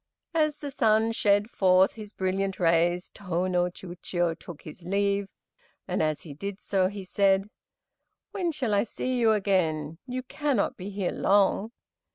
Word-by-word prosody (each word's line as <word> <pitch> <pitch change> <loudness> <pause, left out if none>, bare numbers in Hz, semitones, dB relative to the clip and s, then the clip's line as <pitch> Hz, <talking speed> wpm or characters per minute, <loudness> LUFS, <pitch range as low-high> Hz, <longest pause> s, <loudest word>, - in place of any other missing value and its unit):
As 305 -2 +2
the 290 -2 -6
sun 220 -2 +3
shed 205 0 +2
forth 185 0 +4
his 215 -2 -9
brilliant 190 0 -1
rays 175 +1 +2
Tô 185 -3 -2
no 180 -1 +2
Chiûjiô 175 -1 -3
took 170 -4 -10
his 160 +3 -11
leave, 200 +2 0 0.6
and - - 0
as 155 -2 0
he 150 - -9
did 200 +6 -6
so 190 -2 +1
he 200 0 -6
said, 195 +1 +2 0.8
"When 355 -4 -1
shall 255 -8 -1
I 200 - +4
see 255 +3 -3
you 225 -2 +4
again, 165 -6 0
you 255 0 -3
cannot 275 -4 0
be 190 +2 -7
here 195 -2 -2
long?" 200 +2 +2
195 Hz, 160 wpm, -27 LUFS, 180-215 Hz, 0.8 s, forth